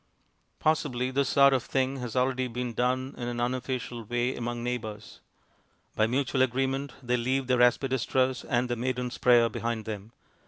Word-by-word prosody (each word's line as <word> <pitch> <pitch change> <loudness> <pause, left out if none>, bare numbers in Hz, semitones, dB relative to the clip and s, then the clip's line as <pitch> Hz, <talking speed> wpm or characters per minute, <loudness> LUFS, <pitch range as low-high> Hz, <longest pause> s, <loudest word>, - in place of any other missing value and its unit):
Possibly 130 -5 0
this 135 0 +1
sort 140 -1 +6
of 130 - +2
thing 135 +2 -1
has 125 -2 -5
already 130 0 +1
been 125 0 -4
done 130 +3 0
in 120 - -3
an 120 0 -3
unofficial 125 -1 -2
way 120 +3 -1
among 120 0 -4
neighbors. 110 -4 -5 0.8
By 110 - +3
mutual 130 +2 0
agreement 135 +1 0
they 125 0 +1
leave 130 +3 0
their 125 -1 +2
aspidistras 130 +1 +2
and 125 +1 0
their 120 - -1
"Maiden's 125 0 -2
Prayer" 120 -2 +5
behind 115 0 -3
them. 105 0 -6
125 Hz, 160 wpm, -28 LUFS, 120-130 Hz, 0.8 s, sort